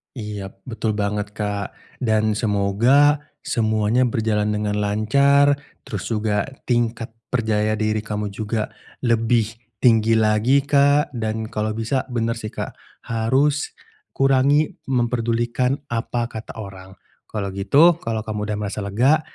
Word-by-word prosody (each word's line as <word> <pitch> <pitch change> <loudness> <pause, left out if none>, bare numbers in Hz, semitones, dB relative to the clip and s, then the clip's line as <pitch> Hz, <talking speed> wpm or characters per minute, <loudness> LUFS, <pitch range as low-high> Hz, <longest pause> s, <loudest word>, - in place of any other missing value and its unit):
Iya 105 -4 -6
betul 110 -3 -2
banget, 105 0 -2
Kak 105 -2 -3 0.3
dan 110 -2 +2
semoga 115 +8 +3 0.2
semuanya 110 +1 +1
berjalan 110 -2 0
dengan 105 0 -1
lancar, 140 +8 +3 0.3
terus 105 -3 -5
juga 105 -2 0 0.2
tingkat 120 -1 0 0.2
percaya 110 -3 0
diri 110 0 0
kamu 105 -1 -4
juga 110 +1 -3 0.3
lebih 115 -2 +2 0.3
tinggi 115 -2 +5
lagi 110 +5 +3
Kak, 145 +1 +3
dan 110 -1 -2
kalau 110 0 -1
bisa 115 +4 -1
bener 115 -1 0
sih 110 -1 -6
Kak, - - -5 0.4
harus 130 +6 +1 0.4
kurangi 135 +3 +3 0.2
mempedulikan 120 +1 0 0.2
apa 120 +1 -1
kata 110 0 -8
orang. 95 -2 -9 0.3
Kalau 100 -3 -4
gitu 150 - +4
kalau 115 -5 -3
kamu 110 -1 -4
udah 105 - -1
merasa 105 0 -4
lega, 120 +10 +2
110 Hz, 125 wpm, -22 LUFS, 105-125 Hz, 0.4 s, tinggi